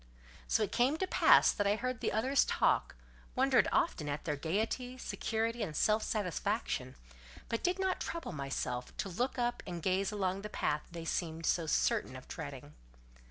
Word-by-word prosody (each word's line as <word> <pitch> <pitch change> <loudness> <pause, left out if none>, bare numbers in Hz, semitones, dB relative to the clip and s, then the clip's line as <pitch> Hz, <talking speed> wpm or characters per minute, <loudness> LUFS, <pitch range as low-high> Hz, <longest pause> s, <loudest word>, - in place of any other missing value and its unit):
So 220 - +2
it 205 - -2
came 260 +6 +2
to 375 - 0
pass - - +6
that 205 - 0
I 205 - +3
heard 255 +2 -3
the - - 0
others 260 +6 +3
talk, - - +1 0.4
wondered 265 +2 +4
often 155 - +1
at 145 +1 -4
their 150 - 0
gaiety, 220 - -2
security, 230 -1 -2
and 160 -8 -3
self 215 +7 +3
satisfaction, 200 - -2 0.5
but 230 - -1
did 360 +1 +1
not 380 -1 0
trouble 335 - -4
myself 135 -4 -4
to 195 - -2
look 245 +10 -1
up 240 0 0
and 175 -2 -4
gaze 190 +3 +1
along 195 -2 -1
the 210 - -6
path 150 -7 0
they 170 -1 -6
seemed 165 -1 -2
so 165 -1 +1
certain - - +1
of - - -10
treading. - - -7
210 Hz, 175 wpm, -33 LUFS, 165-245 Hz, 0.5 s, pass